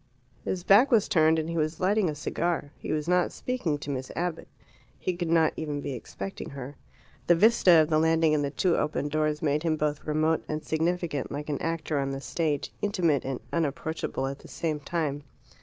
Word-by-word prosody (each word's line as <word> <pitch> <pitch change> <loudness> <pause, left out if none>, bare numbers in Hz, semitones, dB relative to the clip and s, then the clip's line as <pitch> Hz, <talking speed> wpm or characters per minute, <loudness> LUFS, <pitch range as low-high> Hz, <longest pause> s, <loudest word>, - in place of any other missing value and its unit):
His 180 -2 -3
back 210 +9 +6
was 230 -6 +4
turned, 160 -1 +4
and 160 0 -1
he 170 0 -3
was 155 0 -1
lighting 195 0 +2
a 150 - -3
cigar. 155 0 -2
He - - -5
was 155 0 -1
not 180 0 +2
speaking 225 -13 -2
to 145 0 -5
Miss 130 -1 -4
Abbott. 175 -1 -3 0.5
He 185 - -2
could 175 -1 -3
not 165 -1 +4
even 150 -2 -3
be 140 - -4
expecting 95 -5 -7
her. 140 +1 -8 0.5
The 175 - +6
vista 205 -1 +5
of 155 - -5
the 155 - +4
landing 160 -1 +3
and 150 -1 +2
the 140 - 0
two 170 +4 +1
open 150 -1 -1
doors 155 0 0
made 150 0 +1
him 160 -1 +1
both 150 -1 -2
remote 155 +1 +1
and 155 0 -3
significant, 165 -2 -1
like 145 +2 -5
an 145 - -2
actor 160 -3 -1
on 135 0 -1
the 135 - -4
stage, 150 +1 -2
intimate 175 -9 +1
and 130 -1 -3
unapproachable 160 -3 -2
at 135 +1 -4
the - - -14
same 155 -3 -2
time. 145 -2 -2
155 Hz, 205 wpm, -27 LUFS, 145-170 Hz, 0.5 s, back